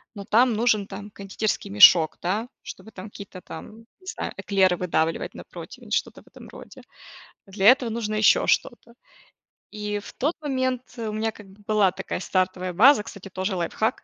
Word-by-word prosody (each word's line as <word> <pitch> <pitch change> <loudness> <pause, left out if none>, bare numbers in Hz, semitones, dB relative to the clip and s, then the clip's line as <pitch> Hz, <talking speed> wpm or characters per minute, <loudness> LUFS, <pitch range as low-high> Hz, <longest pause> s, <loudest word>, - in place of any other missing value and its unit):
но 200 -1 -8
там 240 +4 +3
нужен, 215 -2 +1
там, 205 +1 -9
кондитерский 200 +2 -3
мешок, 155 - +7
да, 205 +7 -2 0.2
чтобы 220 - -10
там 195 +1 -10
какие-то, 200 -2 -11
там, 195 +7 -10 0.2
не 370 - -21
знаю, - - -4
эклеры 190 -3 +2
выдавливать 165 -2 -1
на - - -9
противень, - - -12
что-то - - -2
в - - -28
этом - - -14
роде. - - -13 0.7
А - - -18
для 195 0 -3
этого 250 0 +6
нужно 220 -1 -3
ещё 215 0 +4
что-то. 235 - -1 0.8
И 210 0 -3
в 205 - -11
тот 300 +6 -2
момент 260 -3 -1 0.2
у 225 -2 -4
меня, 220 +1 -1
как 210 -2 -15
бы, 195 +2 -19
была 210 -3 +3
такая - - -4
стартовая 185 -1 -1
база, 230 +4 +6
кстати, 200 -2 -11
тоже 190 +1 -3
лайфхак 180 +5 -2
210 Hz, 180 wpm, -24 LUFS, 185-225 Hz, 0.8 s, мешок